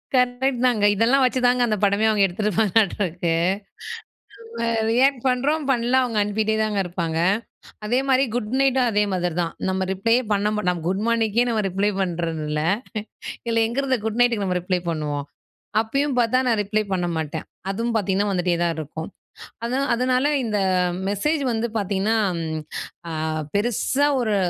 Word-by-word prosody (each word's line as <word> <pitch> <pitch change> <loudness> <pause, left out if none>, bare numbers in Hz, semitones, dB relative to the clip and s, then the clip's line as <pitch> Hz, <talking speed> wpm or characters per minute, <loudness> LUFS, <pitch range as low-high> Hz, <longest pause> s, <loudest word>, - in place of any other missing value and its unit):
Correct 250 0 +1
தாங்க. 215 -4 +2
இதெல்லாம் 245 +6 +3
வச்சு 255 +1 +1
தாங்க 245 0 +3
அந்த 215 -2 0
படமே 200 +2 +3
அவுங்க 210 -2 +3
எடுத்துப்பாங்கட்ட 210 +1 +1
இருக்கு 170 0 -1 1.3
அ - - 0
நம்ம 225 -1 0
ரியாக்ட் 260 +1 +3
பண்றோம் 280 +4 +1
பண்ணல 245 +1 +2
அவுங்க 230 -4 -2
அனுப்பிட்டே 215 +1 0
தாங்க 210 -2 -1
இருப்பாங்க. 170 -2 -3 0.7
அதே 245 +4 +2
மாதிரி 265 0 +4
குட் 215 -2 -2
நைட்டும் 265 -2 +3
அதே 210 0 +3
மாதிரி 180 -2 -1
தான். 165 - -4 0.2
நம்ம 190 0 0
ரிப்ளேயே 230 +6 +2
பண்ண 205 +1 +1 0.2
நம்ம 175 -1 -1
குட் 195 +3 -1
மார்னிக்கே 230 0 +2
நம்ம 220 -2 +1
ரிப்ளை 195 +3 +1
பண்றதில்ல. 165 -4 -2 0.8
இதுல 230 -1 +2
எங்க 235 +3 -6
இருந்து 265 -2 +1
குட் 220 +2 -2
நைட்டுக்கு 230 -5 +2
நம்ம 180 -1 0
ரிப்ளை 180 0 0
பண்ணுவோம். 150 -3 -2 0.6
அப்பயும் 275 +4 -1
பார்த்தா 240 +2 +3
நான் 225 -3 +2
ரிப்ளை 215 +2 0
பண்ண 180 -2 0
மாட்டேன். 160 0 -3 0.2
அதுவும் 230 +4 -1
பார்த்தீங்கன்னா, 200 0 +1
வந்துட்டே 180 -2 +1
தான் 170 -1 +1
இருக்கும். 160 +1 -6 0.6
அதானா 260 +4 0
அதனால 255 +2 +1 0.2
இந்த 215 -2 -1 0.5
மெசேஜ் 285 +10 0
வந்து 230 +1 -1
பார்த்தீங்கன்னா, 200 +2 0 0.3
ம், 160 -1 -3 0.5
அ - - -5 0.4
பெருசா 240 +6 +1
ஒரு 215 -4 +1
215 Hz, 155 wpm, -23 LUFS, 185-245 Hz, 1.3 s, மாதிரி